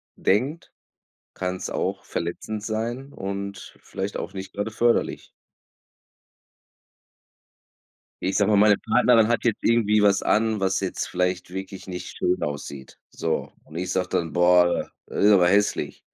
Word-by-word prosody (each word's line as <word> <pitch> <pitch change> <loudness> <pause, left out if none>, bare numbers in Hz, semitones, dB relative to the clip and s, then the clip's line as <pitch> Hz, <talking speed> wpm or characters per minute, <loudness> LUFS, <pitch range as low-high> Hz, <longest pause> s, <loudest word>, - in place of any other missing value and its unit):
denkt, 135 - 0 0.6
kann's 90 0 -3
auch - - -2
verletzend 105 +5 -4
sein 120 +5 -3
und 100 0 -6
vielleicht 95 +1 -5
auch - - -5
nicht 95 0 -7
gerade 100 +2 -2
förderlich. 120 +2 +1 2.9
Ich 95 +1 -1
sage 105 0 +3
mal, 105 - +5
meine 105 0 +6
Partnerin 115 -1 +4
hat 120 -1 0
jetzt 115 -3 +1
irgendwie 110 -2 +3
was 100 -1 +4
an, 110 0 +1
was 95 0 0
jetzt 95 - -3
vielleicht 90 0 -1
wirklich 95 +1 -7
nicht 90 -1 -7
schön 90 +1 0
aussieht, 70 -2 -6
so. 80 -1 -2
Und 80 - -11
ich 90 +1 -3
sage 90 0 -1
dann: 85 -1 -1
„Boah, 90 0 +3 0.2
das - - -2
ist 105 - +7
aber 90 -3 +6
hässlich“. 100 +3 +1
100 Hz, 140 wpm, -24 LUFS, 90-110 Hz, 2.9 s, ist